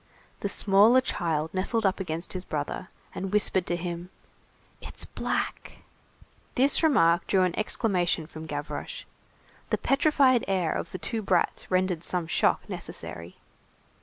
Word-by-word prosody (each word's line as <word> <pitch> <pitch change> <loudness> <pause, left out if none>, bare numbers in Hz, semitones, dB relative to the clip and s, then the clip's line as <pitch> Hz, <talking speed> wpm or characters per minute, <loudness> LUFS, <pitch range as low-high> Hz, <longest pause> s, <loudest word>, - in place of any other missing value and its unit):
The 200 - -2
smaller 205 +6 +5
child 165 -10 -2
nestled 205 +4 0
up 190 - +1
against 170 -2 -3
his 185 -1 -5
brother, 150 +2 -4 0.2
and 190 0 -4
whispered 200 -3 +2
to 175 - 0
him:— 175 0 -5 0.7
"It's - - -6
black." - - -3 0.8
This 270 +3 +4
remark 175 - +3
drew 190 -2 +3
an 180 -2 0
exclamation 180 -6 0
from 160 0 -9
Gavroche. 145 -1 -5 0.7
The - - +1
petrified 275 -3 +3
air 185 -4 0
of - - -4
the - - -4
two 225 +3 -3
brats 190 -4 0
rendered 185 -2 0
some 175 0 -2
shock 160 - +1
necessary. 85 +2 -7
185 Hz, 135 wpm, -27 LUFS, 170-210 Hz, 0.8 s, smaller